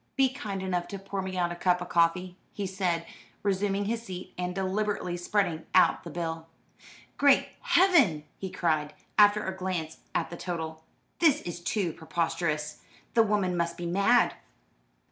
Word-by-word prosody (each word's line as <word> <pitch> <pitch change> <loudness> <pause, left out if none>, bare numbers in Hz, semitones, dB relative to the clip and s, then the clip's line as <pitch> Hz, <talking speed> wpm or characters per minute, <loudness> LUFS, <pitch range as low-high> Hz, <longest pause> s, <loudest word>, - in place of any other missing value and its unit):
"Be 270 -1 +4
kind 200 -6 -4
enough 180 -2 -1
to 200 - -6
pour 195 0 -4
me 185 0 -4
out 175 -1 +1
a - - -4
cup 180 0 +2
of 180 0 -6
coffee," 175 +2 +2 0.2
he 205 - -3
said, 185 -3 -1 0.4
resuming 200 0 0
his 230 +2 -1
seat, 185 -5 -8
and 180 0 -3
deliberately 195 -1 -1
spreading 175 -2 -1
out 185 - +5
the 170 - -7
bill. 165 0 -4 0.7
"Great 280 -1 +5
Heaven!" 280 - +4 0.2
he 190 - -4
cried, 155 -4 0 0.2
after 205 0 +6
a 190 - -3
glance 180 -4 -3 0.2
at - - 0
the 170 - -6
total. 160 -3 -5 0.4
"This 295 -4 +4
is 175 0 -5
too 175 -1 -1
preposterous. 160 -2 -2 0.3
The 230 - +6
woman 205 -4 +1
must 170 0 -1
be 175 - -5
mad." 200 +8 +3
180 Hz, 165 wpm, -28 LUFS, 170-200 Hz, 0.7 s, after